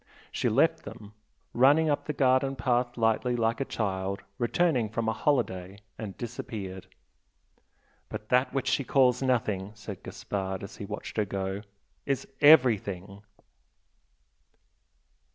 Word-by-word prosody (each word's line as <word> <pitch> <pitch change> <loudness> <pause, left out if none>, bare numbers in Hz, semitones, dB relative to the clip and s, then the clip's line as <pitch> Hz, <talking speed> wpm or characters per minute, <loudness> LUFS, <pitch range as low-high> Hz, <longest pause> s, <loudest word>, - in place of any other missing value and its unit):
She - - 0
left - - +3
them, 105 0 -11 0.4
running 145 +6 +5
up 145 -1 0
the - - -2
garden 135 0 +2
path 125 0 0
lightly 115 +2 +1
like 115 +1 0
a - - 0
child 95 -4 -3 0.2
returning 125 -2 +1
from 115 +1 -2
a 110 - +2
holiday, 100 - -1 0.2
and 105 -4 -7
disappeared. 105 -5 -6 1.2
"But 105 0 -7
that 125 +1 +3
which 135 - -2
she 140 - +1
calls 125 -1 +3
nothing" 110 -6 0
said 105 -2 -8
Gaspard 95 -1 -4
as 100 - -9
he 100 - -6
watched 105 +2 -7
her 105 - +2
go 95 0 -3 0.5
"is 140 -2 -1 0.2
everything!" 105 - +4
115 Hz, 130 wpm, -28 LUFS, 100-130 Hz, 1.2 s, running